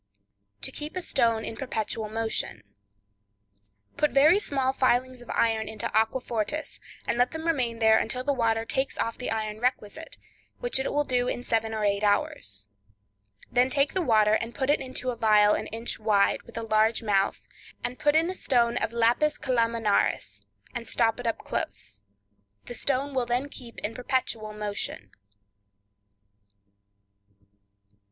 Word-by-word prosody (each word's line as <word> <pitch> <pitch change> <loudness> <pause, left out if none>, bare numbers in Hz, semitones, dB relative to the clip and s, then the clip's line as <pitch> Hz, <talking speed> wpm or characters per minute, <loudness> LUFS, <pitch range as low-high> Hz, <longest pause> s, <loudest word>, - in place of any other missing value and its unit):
To - - 0
Keep 300 +3 -5
a 370 - -2
Stone 230 -7 +1
in - - -5
Perpetual 220 -3 -3
Motion.—Put 100 - -6
very 305 +8 +5
small 270 -8 0
filings 255 -1 +1
of 240 - -14
iron 220 -2 +1
into 220 -1 -4
aquafortis, 225 +4 -1 0.3
and 235 - 0
let 245 +1 +4
them 320 0 -6
remain 255 -8 0
there 220 -1 +5
until 255 0 -2
the 285 +1 +1
water 225 -3 +1
takes 265 +3 -1
off 230 - -2
the 250 - -3
iron 215 -1 -3
requisite, 250 +5 -2 0.4
which - - -1
it 265 - -1
will 295 - +2
do 250 -3 0
in 245 - -3
seven 225 -2 0
or 220 -1 -2
eight 200 0 +1
hours. 100 - 0 0.8
Then 250 +1 +3
take 280 +1 +1
the 375 - +1
water 215 -8 +4
and 230 +2 -1
put 270 0 +1
it 295 - +2
into 255 -1 -3
a - - -5
phial 210 -2 +5
an - - -2
inch 230 +2 -4
wide, 210 -2 +2
with 235 - -11
a 230 - -2
large 220 +1 +2
mouth, 200 -2 0 0.4
and 250 - -3
put 295 0 +3
in 325 +1 +4
a - - -4
stone 240 -9 +1
of - - -1
lapis 240 +6 +2
calaminaris, 230 - 0 0.3
and 230 -1 -4
stop 225 0 +2
it 245 - -3
up 230 - 0
close; 100 0 -4 0.6
the - - -7
stone 275 +3 0
will 255 -2 0
then 250 +4 0
keep 240 -4 -11
in 210 - -3
perpetual 245 -4 -2
motion. 205 - -4
230 Hz, 160 wpm, -27 LUFS, 215-260 Hz, 0.8 s, very